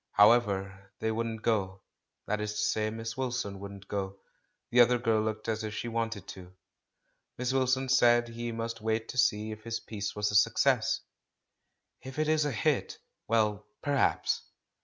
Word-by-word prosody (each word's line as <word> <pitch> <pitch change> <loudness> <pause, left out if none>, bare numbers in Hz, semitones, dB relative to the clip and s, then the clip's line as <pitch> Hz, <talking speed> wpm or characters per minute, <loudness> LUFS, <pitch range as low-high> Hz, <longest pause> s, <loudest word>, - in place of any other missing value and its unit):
How 105 +2 +8
ever, 100 -4 -1
they 110 0 0
wouldn't 115 0 -3
go; 95 -4 0 0.4
that 105 0 -1
is 105 0 -2
to 105 - -4
say. 110 0 +1
Miss 115 +1 -5
Wil 130 -1 -2
son 100 -6 -3
wouldn't 100 0 -9
go; 100 -1 -3 0.5
the 125 - +4
other 120 +1 +6
girl 115 -2 +2
looked 110 0 -3
as 110 -1 -1
if 105 -1 -4
she 120 - -4
wanted 115 -4 -3
to. 90 -1 -10 0.8
Miss 125 +1 -1
Wilson 130 0 +2
said 120 -2 +5
he 120 0 -4
must 115 0 -4
wait 110 +1 -1
to 125 - -3
see 105 -1 +2
if 110 0 -8
his 115 0 -3
piece 100 -2 -5
was 105 0 0
a - - -2
success. 115 +1 +3 1.0
"If 130 +1 -9
it 155 - +2
makes 155 -1 +2
a 145 - 0
hit, 110 - 0 0.3
well 105 -2 +1
— - - -55
perhaps!" 145 -2 +1
110 Hz, 180 wpm, -30 LUFS, 105-120 Hz, 1.0 s, How